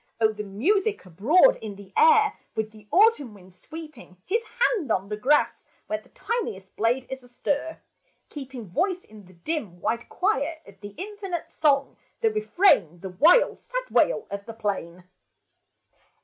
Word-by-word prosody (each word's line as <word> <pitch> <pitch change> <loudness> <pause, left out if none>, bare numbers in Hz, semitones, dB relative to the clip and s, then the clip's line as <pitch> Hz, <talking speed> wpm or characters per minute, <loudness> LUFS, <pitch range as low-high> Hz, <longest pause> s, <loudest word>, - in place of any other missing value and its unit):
O 220 -1 +3
the 210 - -6
music 380 - 0
abroad 285 - +4
in 210 -2 -7
the 195 -1 -14
air, 450 -2 +5 0.2
With 220 0 -2
the 215 -1 -17
autumn 370 - +3
wind 185 -2 -16
sweeping 290 - -11
His 450 +5 +1 0.2
hand 410 - +2
on 195 -1 0
the 210 - -2
grass, 275 +8 +1 0.2
where 215 0 -3
The - - -24
tiniest 385 - -4
blade 240 +4 +1
is 265 0 -6
astir, 280 +5 -3 0.5
keeping 265 -5 -8
Voice 360 - -1
in 210 -2 -15
the 185 - -18
dim, 190 - -4
wide 230 +5 -2
choir, 335 -5 0
Of 195 -1 -16
the 205 -1 -9
infinite 390 -2 -5
song, 280 -3 +1 0.2
the 450 -1 +3
refrain, 360 - +2
The 190 - -6
wild, 315 - +4
sad - - -5
wail - - +2
of 200 0 -6
the 230 - -6
plain 185 -5 -4
260 Hz, 160 wpm, -25 LUFS, -, 0.5 s, air